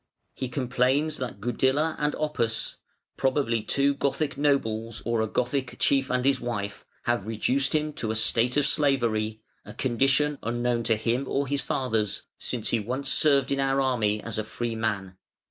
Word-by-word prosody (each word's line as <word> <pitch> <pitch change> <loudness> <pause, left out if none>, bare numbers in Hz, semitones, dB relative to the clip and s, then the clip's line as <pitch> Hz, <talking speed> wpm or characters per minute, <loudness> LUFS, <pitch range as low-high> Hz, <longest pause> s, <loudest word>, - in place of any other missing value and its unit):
"He 130 - -4
complains 130 +4 +1
that 120 -6 -5
Gudila 130 +8 +1
and 150 0 0
Oppas 120 -7 -1 0.4
(probably 130 -4 +1
two 140 +6 +2
Gothic 140 +1 -1
nobles 115 -6 0
or 115 -1 +1
a 110 - 0
Gothic 125 +3 -1
chief 135 -1 +2
and 125 0 0
his 135 -1 +3
wife) 105 -4 -4 0.2
have 120 -4 0
reduced 130 +6 +1
him 150 0 0
to 110 - -4
a 110 - -1
state 115 +3 +3
of 145 - +4
slavery, 115 -7 +1 0.2
a - - -11
condition 135 +4 +2
unknown 120 0 0
to 115 - +3
him 120 +5 -1
or 140 +1 0
his 140 +1 -1
fathers, 110 -6 -1 0.2
since 120 -4 -2
he 115 - +2
once 125 +6 -3
served 140 -4 +3
in 140 - +1
our 135 0 +2
army 115 -6 +1
as 115 -1 -3
a - - -1
free 115 +2 -4
man. 100 -4 -2
125 Hz, 170 wpm, -27 LUFS, 115-140 Hz, 0.4 s, of